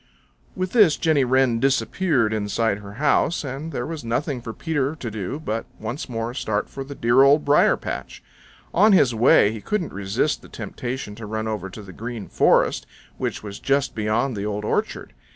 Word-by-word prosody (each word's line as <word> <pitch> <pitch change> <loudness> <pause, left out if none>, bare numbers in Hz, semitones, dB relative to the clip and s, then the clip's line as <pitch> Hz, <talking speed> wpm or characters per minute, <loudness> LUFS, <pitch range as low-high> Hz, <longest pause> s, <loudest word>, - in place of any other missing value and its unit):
With 185 -1 -2
this 205 -10 +5
Jenny 155 -4 +2
Wren 130 -2 +2
disappeared 135 -2 +1
inside 105 0 0
her 100 -1 -10
house, 150 +6 +1
and 140 +4 -5
there 120 -4 -3
was 160 -3 -6
nothing 125 +3 -2
for 115 - -6
Peter 145 +2 -2
to 120 -7 -6
do 105 +7 -4
but 115 -7 -3
once 120 +7 -5
more 115 0 -3
start 110 -5 -2
for 135 - -7
the 140 +1 -9
dear 120 +2 +4
Old 140 +2 +5
Briar 145 +1 +4
patch. - - -6 0.5
On 210 +4 +5
his 135 -10 +5
way 110 -2 +5
he 110 -1 -7
couldn't 195 - -2
resist 95 0 -1
the - - -15
temptation 125 -4 -5
to 110 0 -8
run 110 +1 -3
over 105 -4 -3
to 105 +3 -10
the 95 -2 -11
Green 115 0 -6
Forest, - - +2 0.3
which - - -3
was 100 -1 -7
just 140 0 +1
beyond 110 +4 0
the 100 - -4
Old 105 0 -3
Orchard. - - -2
120 Hz, 190 wpm, -23 LUFS, 110-145 Hz, 0.5 s, this